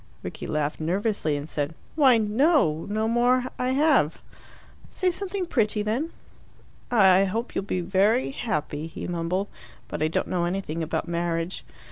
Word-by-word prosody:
Rickie -, -, -6 dB
laughed 150 Hz, 0 st, -1 dB
nervously, 175 Hz, -2 st, 0 dB
and 145 Hz, +1 st, -6 dB
said, 150 Hz, 0 st, -3 dB, 0.2 s
"Why 270 Hz, -6 st, +5 dB
no! 220 Hz, -, +2 dB
No 215 Hz, +1 st, 0 dB
more 245 Hz, +2 st, +3 dB
I 250 Hz, -, 0 dB
have." 275 Hz, -, +3 dB, 0.7 s
"Say 370 Hz, -1 st, 0 dB
something 385 Hz, +1 st, -3 dB
pretty, 215 Hz, -8 st, +1 dB
then." 240 Hz, +10 st, -1 dB, 0.8 s
"I 195 Hz, -4 st, +5 dB
hope 225 Hz, +5 st, -3 dB
you'll 195 Hz, -, -2 dB
be 185 Hz, -2 st, -1 dB
very 200 Hz, +9 st, +2 dB
happy," 155 Hz, -, -3 dB
he 165 Hz, -, -7 dB
mumbled. 175 Hz, +3 st, -1 dB, 0.4 s
"But -, -, -5 dB
I 155 Hz, -, +3 dB
don't 160 Hz, -, -1 dB
know 175 Hz, -2 st, 0 dB
anything 175 Hz, -3 st, -3 dB
about 160 Hz, +1 st, -2 dB
marriage." 170 Hz, +1 st, -2 dB
195 Hz, 150 wpm, -25 LUFS, 165-245 Hz, 0.8 s, Why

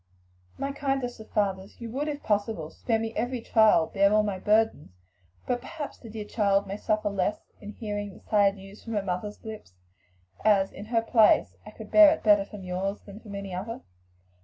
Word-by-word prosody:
"My 275 Hz, -, -2 dB
kindest 270 Hz, -4 st, -2 dB
of 220 Hz, -, -12 dB
fathers! 195 Hz, -2 st, -2 dB
you 230 Hz, -2 st, -7 dB
would 280 Hz, +5 st, -2 dB
if 290 Hz, -1 st, -4 dB
possible 205 Hz, -6 st, -1 dB
spare 225 Hz, -2 st, -1 dB
me 225 Hz, 0 st, -4 dB
every 245 Hz, +3 st, -1 dB
trial, 220 Hz, -7 st, +4 dB
bear 200 Hz, +3 st, +2 dB
all 215 Hz, 0 st, +4 dB
my 200 Hz, -3 st, -2 dB
burdens. 210 Hz, -, +1 dB, 0.5 s
But 245 Hz, -1 st, -1 dB
perhaps 305 Hz, +1 st, -7 dB
the 230 Hz, -, -11 dB
dear 215 Hz, -1 st, -6 dB
child 200 Hz, -2 st, +1 dB
may 195 Hz, +1 st, -5 dB
suffer 215 Hz, 0 st, 0 dB
less 195 Hz, +1 st, -2 dB
in 210 Hz, 0 st, -9 dB
hearing 205 Hz, -3 st, -5 dB
the -, -, -17 dB
sad 200 Hz, -2 st, +3 dB
news 195 Hz, +1 st, -13 dB
from 230 Hz, -, -6 dB
her 205 Hz, -2 st, 0 dB
mother's 195 Hz, +4 st, -4 dB
lips, 215 Hz, -, -9 dB, 0.7 s
as, 195 Hz, -3 st, +3 dB
in 205 Hz, -, -9 dB
her 225 Hz, 0 st, 0 dB
place, 225 Hz, -2 st, +4 dB
I -, -, -6 dB
could 215 Hz, 0 st, -11 dB
bear 315 Hz, -1 st, +9 dB
it -, -, -15 dB
better 205 Hz, -2 st, +5 dB
from 200 Hz, -1 st, -10 dB
yours 185 Hz, +2 st, -3 dB
than 200 Hz, +1 st, -12 dB
from 210 Hz, -3 st, -10 dB
any 200 Hz, -1 st, -6 dB
other." 205 Hz, +6 st, -5 dB
210 Hz, 200 wpm, -27 LUFS, 195-225 Hz, 0.7 s, bear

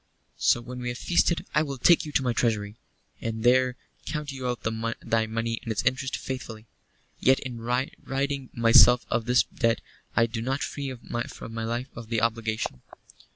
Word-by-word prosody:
"So 120 Hz, -, +3 dB
when 125 Hz, +1 st, -8 dB
we 125 Hz, -, -4 dB
have 120 Hz, -, -4 dB
feasted 170 Hz, +2 st, +2 dB
I 150 Hz, -, +4 dB
will 140 Hz, -3 st, -3 dB
take 170 Hz, +7 st, +5 dB
you -, -, -6 dB
to 135 Hz, -, +2 dB
my 125 Hz, -2 st, +1 dB
treasury, 105 Hz, -3 st, 0 dB, 0.5 s
and 110 Hz, -1 st, -3 dB
there 125 Hz, 0 st, +4 dB, 0.3 s
count 150 Hz, -1 st, -3 dB
you 130 Hz, -2 st, -4 dB
out 125 Hz, -1 st, -3 dB, 0.4 s
thy 110 Hz, -1 st, 0 dB
money 115 Hz, +1 st, -2 dB
and 115 Hz, -, -4 dB
its 110 Hz, -, -1 dB
interest 130 Hz, +1 st, 0 dB
faithfully. 115 Hz, -4 st, -6 dB, 0.5 s
Yet 130 Hz, +1 st, +4 dB
in 125 Hz, -3 st, -6 dB
ridding 135 Hz, +2 st, -2 dB
myself 115 Hz, +1 st, +6 dB
of 115 Hz, -, +1 dB
this 125 Hz, 0 st, +4 dB
debt 115 Hz, -1 st, 0 dB, 0.4 s
I 115 Hz, -, +5 dB
do 115 Hz, -1 st, -4 dB
not 135 Hz, +4 st, -1 dB
free 140 Hz, -2 st, -4 dB
my 115 Hz, -1 st, -5 dB
life 120 Hz, +3 st, -3 dB
of 115 Hz, -2 st, -9 dB
the 115 Hz, -1 st, +1 dB
obligation." 110 Hz, -, -1 dB
120 Hz, 175 wpm, -27 LUFS, 115-130 Hz, 0.5 s, myself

